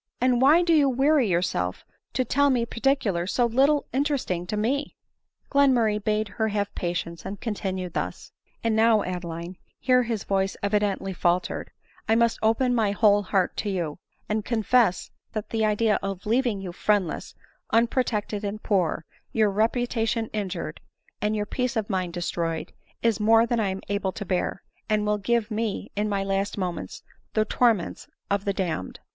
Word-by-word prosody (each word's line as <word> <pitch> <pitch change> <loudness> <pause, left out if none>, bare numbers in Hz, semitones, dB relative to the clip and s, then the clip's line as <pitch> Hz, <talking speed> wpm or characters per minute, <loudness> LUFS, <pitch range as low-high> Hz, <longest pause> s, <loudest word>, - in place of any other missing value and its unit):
and 250 0 +3
why 305 +6 +6
do 340 -1 +3
you 290 -3 +5
weary 270 0 +3
yourself 170 - -1 0.3
to 255 - 0
tell 285 +4 +3
me 245 -3 +2
particulars 230 -8 0
so 245 - +2
little 275 +5 +3
interesting 265 - -1
to 210 - -2
me?" 265 +7 -1 0.6
Glenmurray 240 -7 +3
bade 215 0 +1
her 220 +2 -1
have 205 -1 -2
patience, 170 -1 -3
and 195 +1 -6
continued 190 -5 -3
thus: - - -4 0.2
" - - -39
And 225 -1 +1
now, 220 -1 +4
Adeline, 175 0 -5
( - - -43
here 250 -1 +6
his 230 -4 -2
voice 195 0 0
evidently 200 -2 0
fal 175 0 +2
tered,) - - -6 0.4
I 225 - +5
must 235 0 +2
open 230 +3 +2
my 225 -4 +2
whole 205 -1 +4
heart 190 -2 0
to 210 - -2
you, 175 -5 -3 0.3
and 215 0 -1
confess 225 -4 +2 0.2
that 215 -2 -4
the 225 -1 0
idea 215 0 +2
of 195 -2 -4
leaving 230 -2 +1
you 185 -2 -5
friendless, 195 -1 -1 0.3
unprotected, 225 -3 +1
and 205 +1 -4
poor, 175 -5 0 0.3
your 215 -2 +2
reputation 225 +1 0
injured, 185 -7 -4 0.4
and 210 +1 +1
your 210 -1 -1
peace 250 +3 -2
of 220 -1 -1
mind 185 -2 -1
destroyed, 170 -2 -3 0.3
is 230 -2 +2
more 225 +2 +5
than 235 0 0
I 205 -3 +1
am 190 0 -4
able 200 -2 -1
to 205 - -6
bear, 185 +1 -1 0.3
and 215 -1 +2
will 210 0 +1
give 230 +2 0
me, 215 -1 -2
in 210 +1 0
my 200 -1 0
last 195 +1 -1
moments, 180 -3 -4 0.3
the 215 -1 +3
torments 225 -5 +1 0.2
of 200 0 0
the 200 - +1
damned." 170 - -3
210 Hz, 175 wpm, -25 LUFS, 190-235 Hz, 0.6 s, why